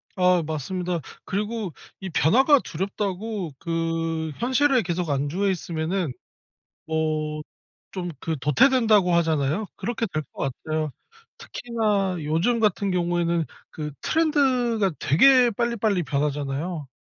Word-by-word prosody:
아 180 -2 +3
맞습니다. 175 +3 -3 0.3
그리고 210 -1 -2 0.3
이 190 - -6
변화가 265 - +5
두렵다고 195 +1 -3
그 165 -1 -2
현실에 260 0 +3
계속 175 -1 -2
안주해 145 +8 0
있으면은 170 -2 -2 0.7
뭐 155 -1 -1 0.5
좀 175 -2 -4
그 160 -2 -3
'도태된다.'고 210 - +4
하잖아요. 160 +3 +1
그렇게 235 0 -2
될 155 - 0
것 135 - -2
같아요. 155 -1 -2 0.5
특히나 210 -6 -1
요즘 170 +11 +1
같은 205 -2 +1
경우에는 170 -2 +1 0.3
그 150 -1 -5
트렌드가 255 - +2
되게 250 - +6
빨리빨리 220 -4 0
변하잖아요. 145 +2 -2
180 Hz, 270 characters per minute, -24 LUFS, 160-220 Hz, 0.7 s, 되게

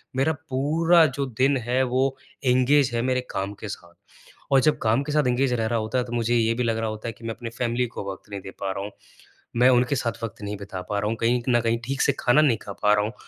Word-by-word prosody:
मेरा 140 +5 +2 0.2
पूरा 160 +5 +4
जो 140 0 -2
दिन 135 +2 +3
है 125 +2 +2
वो 130 +1 +1 0.3
एंगेज 130 +2 +3
है 115 - 0
मेरे 125 +1 0
काम 100 +1 -3
के - - -3
साथ। 85 -3 -9 0.6
और 135 - +6
जब 155 - +3
काम 115 +4 +2
के 150 - -5
साथ 150 0 +3
एंगेज 125 +1 +1
रह 115 -2 0
रहा 115 0 0
होता 110 +3 -2
है 125 - +2
तो 120 - -8
मुझे 120 0 +1
ये 115 -1 +2
भी 125 - -1
लग 115 -1 0
रहा 115 -1 -1
होता 110 +1 -6
है - - -6
कि 110 - -19
मैं 115 - -2
अपनी 120 -2 -6
फैमिली 120 0 0
को 115 - -7
वक़्त 95 - -12
नहीं 100 - -4
दे 95 - -9
पा 95 - -1
रहा 100 +1 -4
हूँ। 105 - -6 0.7
मैं 125 +2 +6
उनके 125 +2 +3
साथ 115 -2 -3
वक़्त 110 -3 -6
नहीं 105 0 -4
बिता 100 -2 -7
पा 100 -1 0
रहा 105 - -1
हूँ, 115 - -1
कहीं 120 +2 +2
न 120 -1 +4
कहीं 115 0 +1
ठीक 135 +2 -2
से - - +3
खाना 120 +5 +4
नहीं 135 -7 +3
खा 100 - -7
पा 105 0 +5
रहा 105 - +2
हूँ 110 - -5
120 Hz, 275 wpm, -24 LUFS, 110-130 Hz, 0.7 s, और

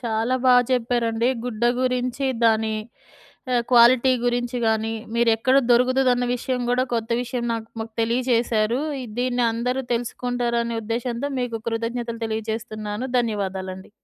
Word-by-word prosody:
చాలా 230 +1 0
బా 255 - +6 0.2
చెప్పారండి. 235 -1 +1 0.2
గుడ్డ 235 -2 -5 0.2
గురించి 255 +1 -1 0.2
దాని 220 -1 +3 0.8
ఆహ్, 240 -1 +2
క్వాలిటీ 245 +1 +6
గురించి 245 0 0
గాని 220 0 +1 0.2
మీరెక్కడ 235 +2 +3
దొరుకుతుదన్న 250 0 +3
విషయం 250 +1 -2
గూడా 250 +1 +2
కొత్త 225 -1 -2
విషయం 245 0 -4
నాకు 225 -1 -4
మాకు 225 0 -6
తెలియజేశారు. 235 -1 +1 0.2
ఇది 230 -4 -9
దీన్ని 250 0 0
అందరూ 250 +3 -1
తెలుసుకుంటారనే 235 0 -1
ఉద్దేశంతో 235 +4 -2
మీకు 245 -2 -2
కృతజ్ఞతలు 230 0 -3
తెలియజేస్తున్నాను, 220 0 -4
ధన్యవాదాలండి. 190 -5 -3
235 Hz, 120 wpm, -23 LUFS, 225-250 Hz, 0.8 s, బా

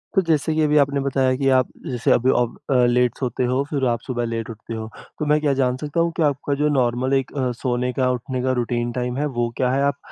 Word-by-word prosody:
तो 190 - +5
जैसे 160 0 +1
कि 155 - +2
अभी 150 0 +3
आपने 140 -1 +3
बताया 130 -1 +1
कि 135 -1 0
आप 130 - +2 0.2
जैसे 125 -1 0
अभी 125 +2 +3
आप 120 -1 0 0.2
अ, - - +4
लेट 125 0 +2
सोते 125 -1 -2
हो, 130 +2 +1
फिर 140 -3 0
आप 120 -1 0
सुबह 120 -2 -2
लेट 115 -1 -4
उठते 115 +1 -8
हो। 110 0 -5 0.3
तो 150 - -1
मैं 150 +1 +3
क्या 145 -2 +2
जान 125 -1 +2
सकता 150 +4 -3
हूँ 170 0 +2
कि 165 - +2
आपका 140 +1 -3
जो 150 - +3
नॉर्मल 130 -1 +1
एक 135 -1 0
अ, 130 -2 0
सोने 125 0 -1
का, 130 -1 +1
उठने 125 +1 -3
का 130 - +1
रूटीन 120 0 -1
टाइम 125 +1 -2
है, 150 - 0
वो 120 -4 -1
क्या 125 -1 +1
है? 135 +1 +1
आप 140 0 +1
130 Hz, 260 wpm, -22 LUFS, 120-140 Hz, 0.3 s, तो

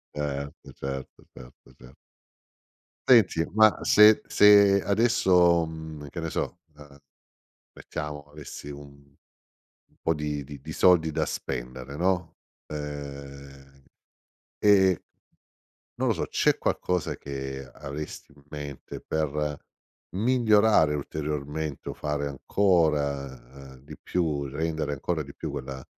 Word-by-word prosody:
Certo, 70 -1 -5
certo, 70 0 -7
certo, 65 0 -15
cer 65 +1 -15 1.2
Senti, 105 -9 +6
ma 110 -1 +6
se 105 0 +7
se 100 -1 +6
adesso, 95 -6 +4
mhmm, 80 -2 -8
che 85 - -5
ne 80 - -3
so, - - -3 0.2
ehm, 70 -1 -15 0.7
mettiamo 75 -1 -6
avessi 75 0 -10
un 70 0 -9 1.0
un - - -33
po' 80 - +1
di 75 -2 -3
di 70 +1 -10
di - - -8
soldi 85 -3 +4
da - - -1
spendere, 65 +3 -5
no, 90 0 0 0.3
ehm, 70 -2 -8 0.8
e 95 -4 +4 1.0
non - - 0
lo - - +2
so, - - -2
c'è - - +2
qualcosa 90 -2 -1
che 70 -1 -6
avresti 75 +1 -7
in 70 - -21
mente 75 -2 -8
per 75 -1 -2 0.6
migliorare 110 -8 +4
ulteriormente 75 0 -4
o - - -5
fare 75 -1 -3
ancora, 70 -6 0
ehm, - - -14
di 75 +1 -11
più, 80 -5 -1
rendere 80 +1 -2
ancora 80 +3 -2
di 70 -1 -12
più - - -5
quella 65 -1 -6
75 Hz, 120 wpm, -26 LUFS, 70-85 Hz, 1.2 s, se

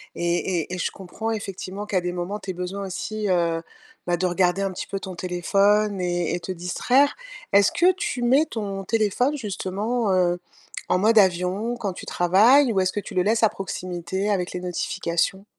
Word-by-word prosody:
et 175 +1 0
et 180 - -8
et - - -5
je 180 - -1
comprends, 205 +4 -5
effectivement, 200 -1 -5
qu'à 190 -3 0
des 180 - -2
moments, 180 +4 -4
tu 195 - -9
aies - - -6
besoin 180 +3 -4
aussi, 205 +2 -3
heu, 170 -2 +1 0.4
bah 175 -1 +1
de 185 - -1
regarder 180 +1 +1
un 195 -1 -1
petit 180 - -5
peu 195 - -4
ton 190 -2 -7
téléphone 200 +4 +2
mais 175 -2 -1
et - - -1
te 185 - -5
distraire. 245 +11 +2 0.4
Est-ce 200 0 +5
que 360 +2 +4
tu 400 -10 -3
mets 265 +6 +4
ton 200 -8 -4
téléphone, 225 +7 +1
justement, 210 +1 -2
heu, 180 -1 +2 0.5
en - - +3
mode 220 +3 +3
avion 190 +5 +2
quand 200 -5 -3
tu - - -9
travailles? 225 +9 +4
Ou 190 - +2
est-ce 185 - +1
que 205 - -3
tu 200 - -8
le 180 - +3
laisses 225 +2 +2
à 220 - +6
proximité 185 0 -4
avec 180 -3 0
les 180 - -4
notifications? 180 +1 -2
195 Hz, 195 wpm, -24 LUFS, 180-215 Hz, 0.5 s, à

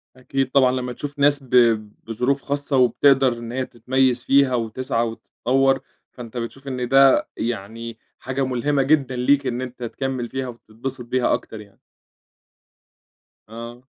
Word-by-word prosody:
أكيد، 130 +1 -2
طبعًا 130 -2 +4
لمّا 125 -1 -3
تشوف 145 +3 -7
ناس 145 0 +3
ب 130 - -17 0.5
بظروف 125 +5 -1
خاصة، 140 0 -1
وبتقدَر 130 +1 +4
إن 120 0 -8
هي 130 +1 -2
تتميز 125 +1 0
فيها 135 -2 +3
وتسعى 115 0 -1
وتتطوّر، 135 +4 0 0.3
فأنت 120 -1 -9
بتشوف 135 +4 -6
إن 125 -2 -3
ده 135 0 +5
يعني 115 0 -5 0.2
حاجة 130 +1 -2
ملهمة 135 +3 0
جدًا 135 -2 +2
ليك، 135 +2 +2
إن 125 0 -2
أنت 125 -1 -7
تكمّل 125 0 -3
فيها 130 -1 -3
وتتبسط 120 +2 -7
بيها 125 +1 +1
أكتر 110 - -4
يعني. 100 -1 -18 1.7
آه. 115 +2 -9
130 Hz, 140 wpm, -22 LUFS, 120-135 Hz, 1.7 s, ده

